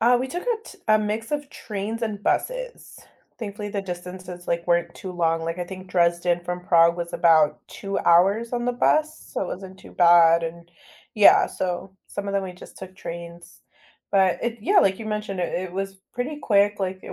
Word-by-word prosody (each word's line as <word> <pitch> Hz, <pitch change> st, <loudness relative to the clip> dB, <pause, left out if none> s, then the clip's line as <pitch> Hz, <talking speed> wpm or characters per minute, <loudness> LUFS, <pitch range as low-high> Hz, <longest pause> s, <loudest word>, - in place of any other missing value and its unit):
Uh, 240 Hz, +2 st, +5 dB
we 260 Hz, -, -1 dB
took 355 Hz, +6 st, -4 dB
a 480 Hz, -2 st, +1 dB
t -, -, -13 dB
a 215 Hz, 0 st, +6 dB
mix 215 Hz, +1 st, -3 dB
of 290 Hz, -1 st, -2 dB
trains 215 Hz, +2 st, -5 dB
and 210 Hz, -3 st, -3 dB
buses. -, -, -2 dB, 0.4 s
Thankfully 205 Hz, -2 st, -5 dB
the 200 Hz, -1 st, -3 dB
distances, 180 Hz, -1 st, -8 dB
like, 170 Hz, 0 st, -1 dB
weren't 170 Hz, 0 st, +1 dB
too 185 Hz, -, -7 dB
long, 165 Hz, -2 st, 0 dB
like, 165 Hz, +2 st, -3 dB
I 180 Hz, -, -2 dB
think 185 Hz, 0 st, -10 dB
Dresden 175 Hz, 0 st, +2 dB
from 180 Hz, 0 st, -4 dB
Prague 170 Hz, 0 st, +5 dB
was 170 Hz, 0 st, -5 dB
about 155 Hz, -3 st, +4 dB
2 195 Hz, 0 st, -4 dB
hours 200 Hz, +7 st, +3 dB
on 240 Hz, -1 st, -1 dB
the 245 Hz, -, +1 dB
bus, 310 Hz, +5 st, +1 dB
so -, -, -5 dB
it -, -, -2 dB
wasn't 190 Hz, +1 st, -8 dB
too -, -, -14 dB
bad, 170 Hz, -1 st, +6 dB
and 170 Hz, +1 st, -6 dB, 0.4 s
yeah, 210 Hz, -2 st, +7 dB
so 185 Hz, +1 st, -4 dB
some 200 Hz, 0 st, -5 dB
of 200 Hz, -, -3 dB
them 200 Hz, -, +1 dB
we 185 Hz, -, -6 dB
just 180 Hz, -, -14 dB
took 190 Hz, -1 st, -10 dB
trains, 170 Hz, -1 st, -9 dB, 0.5 s
but 190 Hz, -2 st, +3 dB
it 235 Hz, 0 st, -2 dB
yeah, 390 Hz, -, +3 dB
like 195 Hz, -, +3 dB
you 225 Hz, -, -7 dB
mentioned 210 Hz, -3 st, -3 dB
it 175 Hz, -, -2 dB
it 185 Hz, 0 st, -3 dB
was 195 Hz, +1 st, -4 dB, 0.2 s
pretty 280 Hz, +5 st, -3 dB
quick, 205 Hz, -1 st, +3 dB
like, 190 Hz, 0 st, -2 dB
it -, -, -8 dB
190 Hz, 205 wpm, -24 LUFS, 175-215 Hz, 0.5 s, yeah